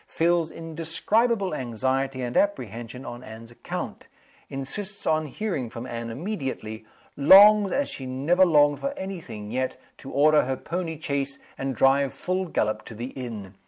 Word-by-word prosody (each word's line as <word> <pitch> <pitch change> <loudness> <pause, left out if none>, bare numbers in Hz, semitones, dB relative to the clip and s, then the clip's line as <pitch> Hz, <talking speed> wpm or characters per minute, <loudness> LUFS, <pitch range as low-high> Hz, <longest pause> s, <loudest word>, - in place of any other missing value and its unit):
Feels 170 -1 +1
indescribable 165 +7 0
anxiety 130 +1 -1
and 120 0 -4
apprehension 125 - -1
on 120 +1 -7
Anne's 115 +1 -11
account. 120 - -6 0.4
Insists 190 +10 -3
on 155 -1 +1
hearing 150 - -3
from 115 +1 -7
Anne 115 -2 -5
immediately. 130 - -4 0.3
Longs, 200 +6 +8
as 285 0 +1
she 130 - -6
never 145 +9 +3
longed 145 -4 +4
for 280 +1 -3
any 190 -1 -5
thing 105 -6 -8
yet, 130 +1 -2 0.2
to 135 - -9
order 150 +1 +4
her 130 0 -2
pony 165 -1 -4
chaise 140 -2 -2 0.2
and 135 -1 -3
drive 135 +2 +3
full 185 +1 -2
gallop 110 -8 -1
to 115 - -9
the 120 +4 -5
inn. 110 -7 -7
140 Hz, 155 wpm, -25 LUFS, 120-175 Hz, 0.4 s, Longs